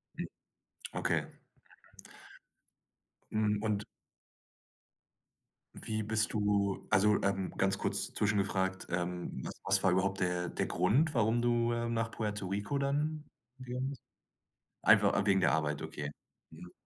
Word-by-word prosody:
Mhm. -, -, -3 dB, 0.7 s
Okay. -, -, 0 dB, 2.1 s
Mhm. 105 Hz, -1 st, +1 dB
Und... 105 Hz, -2 st, -1 dB, 1.9 s
Wie 110 Hz, 0 st, -3 dB
bist 105 Hz, 0 st, +1 dB
du 100 Hz, -2 st, 0 dB
also, 105 Hz, +1 st, +4 dB
ähm, 95 Hz, -1 st, 0 dB
ganz 100 Hz, 0 st, +2 dB
kurz -, -, -1 dB
zwischengefragt, 95 Hz, -2 st, 0 dB
ähm, 90 Hz, 0 st, -3 dB, 0.2 s
was -, -, +2 dB
war 95 Hz, -, +4 dB
überhaupt 95 Hz, +2 st, +1 dB
der 90 Hz, -1 st, 0 dB
der -, -, -1 dB
Grund, 130 Hz, -, +2 dB
warum 115 Hz, 0 st, +2 dB
du, 120 Hz, -1 st, +2 dB
äh, 120 Hz, 0 st, -1 dB
nach 115 Hz, -1 st, 0 dB
Puerto 105 Hz, -3 st, -3 dB
Rico 100 Hz, +8 st, -2 dB
dann 150 Hz, +2 st, -1 dB, 0.4 s
gegangen 130 Hz, +1 st, -3 dB
bist? 140 Hz, -, -8 dB, 0.8 s
Einfach -, -, +6 dB
a 100 Hz, -, +1 dB
wegen 95 Hz, -2 st, +4 dB
der 80 Hz, -, +4 dB
Arbeit, 75 Hz, -2 st, 0 dB
okay. 75 Hz, 0 st, -5 dB, 0.4 s
Mhm. 90 Hz, -, -11 dB
105 Hz, 125 wpm, -32 LUFS, 95-115 Hz, 2.1 s, Einfach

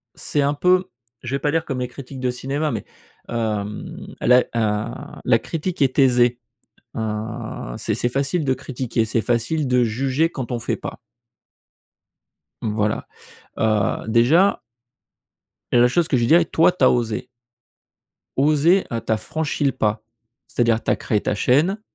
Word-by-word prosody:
c'est 145 Hz, -, -1 dB
un 140 Hz, +1 st, +2 dB
peu, 180 Hz, +5 st, +2 dB, 0.3 s
je 125 Hz, +3 st, -3 dB
vais -, -, -1 dB
pas 145 Hz, +1 st, 0 dB
dire 165 Hz, +1 st, 0 dB
comme 135 Hz, -3 st, -3 dB
les 125 Hz, -, -1 dB
critiques 130 Hz, +1 st, -10 dB
de 125 Hz, -1 st, +1 dB
cinéma 140 Hz, +5 st, -2 dB
mais 110 Hz, -, -4 dB, 0.4 s
hem, 105 Hz, -3 st, -3 dB
la, 125 Hz, +1 st, +6 dB, 0.2 s
heu, 110 Hz, 0 st, 0 dB, 0.3 s
la 120 Hz, -2 st, +4 dB
critique 165 Hz, +7 st, -4 dB
est 135 Hz, +1 st, +2 dB
aisée, 125 Hz, -2 st, +4 dB, 0.6 s
heu, -, -, -2 dB, 0.8 s
c'est -, -, -1 dB
c'est 120 Hz, -, 0 dB
facile 140 Hz, +6 st, -1 dB
de 130 Hz, -2 st, +2 dB
critiquer, 125 Hz, -3 st, -2 dB
c'est 110 Hz, +1 st, 0 dB
facile 125 Hz, +7 st, 0 dB
de 125 Hz, 0 st, +3 dB
juger 135 Hz, +8 st, 0 dB
quand 130 Hz, -5 st, -5 dB
on 120 Hz, -, -2 dB
fait 120 Hz, -, -2 dB
pas. -, -, -7 dB, 1.6 s
Voilà. 105 Hz, -1 st, -1 dB, 0.5 s
Heu, 110 Hz, -3 st, +1 dB
déjà 145 Hz, -, +4 dB, 1.1 s
la 120 Hz, 0 st, +5 dB
chose 165 Hz, +5 st, +1 dB
que -, -, +1 dB
je -, -, 0 dB
lui 115 Hz, -, +2 dB
dirais: 165 Hz, +5 st, +5 dB
«Toi, 165 Hz, +2 st, +4 dB
tu 180 Hz, -, -3 dB
as -, -, +7 dB
osé.» 115 Hz, -1 st, -1 dB, 1.1 s
«Osé, 155 Hz, +6 st, +4 dB
heu, 115 Hz, -1 st, -2 dB
tu -, -, -3 dB
as 110 Hz, -, +3 dB
franchi 150 Hz, +7 st, -3 dB
le 140 Hz, -, +3 dB
pas, 105 Hz, -2 st, -1 dB, 0.4 s
c'est-à-dire 115 Hz, -2 st, +1 dB
tu -, -, +1 dB
as -, -, +3 dB
créé 105 Hz, -, 0 dB
ta -, -, -1 dB
chaîne. 155 Hz, -, +2 dB
125 Hz, 165 wpm, -22 LUFS, 115-150 Hz, 1.6 s, as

